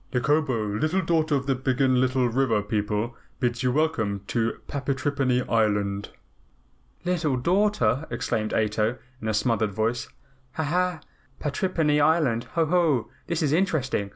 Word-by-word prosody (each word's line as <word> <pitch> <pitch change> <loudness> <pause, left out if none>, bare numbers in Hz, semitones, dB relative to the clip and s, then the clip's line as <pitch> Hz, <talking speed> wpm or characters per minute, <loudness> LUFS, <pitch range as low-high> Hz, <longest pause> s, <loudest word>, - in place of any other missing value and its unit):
"Nikobo, 125 -6 0
Little 170 +4 +1
Daughter 160 -2 +2
of 135 -1 -1
the 135 - +2
Biggenlittle 130 -1 +2
River 120 -5 +2
People, 105 +2 -2 0.2
bids 120 -1 0
you 125 -1 +2
welcome 120 -10 0
to 115 -1 0
Patrippany 135 -2 -1
Island." 105 -3 +1 1.0
"Little 165 -7 +1
daughter!" 160 - +1
exclaimed 115 -2 -2
Ato 110 +2 0 0.2
in 110 - -4
a 110 - +1
smothered 110 -2 +1
voice. 115 +4 -1 0.4
"Ha, 160 - -2
ha! 175 +2 0 0.4
Patrippany 150 -1 +1
Island. 145 -7 +2
Ho, 165 -1 +3
ho! 155 -7 +2 0.2
This 170 -1 -1
is 145 -1 +1
interesting. 145 - 0
130 Hz, 130 wpm, -25 LUFS, 110-155 Hz, 1.0 s, Ho